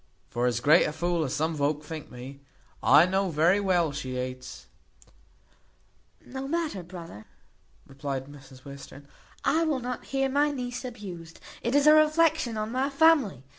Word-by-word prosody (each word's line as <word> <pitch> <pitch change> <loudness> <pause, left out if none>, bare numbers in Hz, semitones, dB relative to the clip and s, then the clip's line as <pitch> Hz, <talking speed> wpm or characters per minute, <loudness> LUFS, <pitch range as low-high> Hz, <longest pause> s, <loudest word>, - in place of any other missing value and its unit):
For 120 +1 0
as 120 -1 -1
great 150 +4 +5
a - - -1
fool 170 +1 -1
as 130 - -3
some 160 +3 0
volk 150 0 -1
think 155 0 -8
me, 130 +3 -10 0.4
I 145 +5 +6
know 190 +1 0
very 170 +5 +3
well 180 -5 +1
she 130 -2 -5
hates 125 0 -6 1.0
" - - -36
"No 265 +1 -4
matter, 315 - -2
brother," 170 - -10 0.6
replied 135 -1 -5
Mrs 135 -2 -15
Western, 140 0 -11 0.4
"I 330 - +2
will 305 -5 0
not 250 0 -5
hear 270 0 0
my 285 +2 +2
niece 250 -3 -5
abused. 185 -9 -9 0.2
It 240 +4 -1
is 285 0 +4
a 305 - +8
reflection 310 -5 +3
on 215 +1 -3
my 260 +3 0
family. 275 - +3
175 Hz, 165 wpm, -27 LUFS, -, 1.0 s, a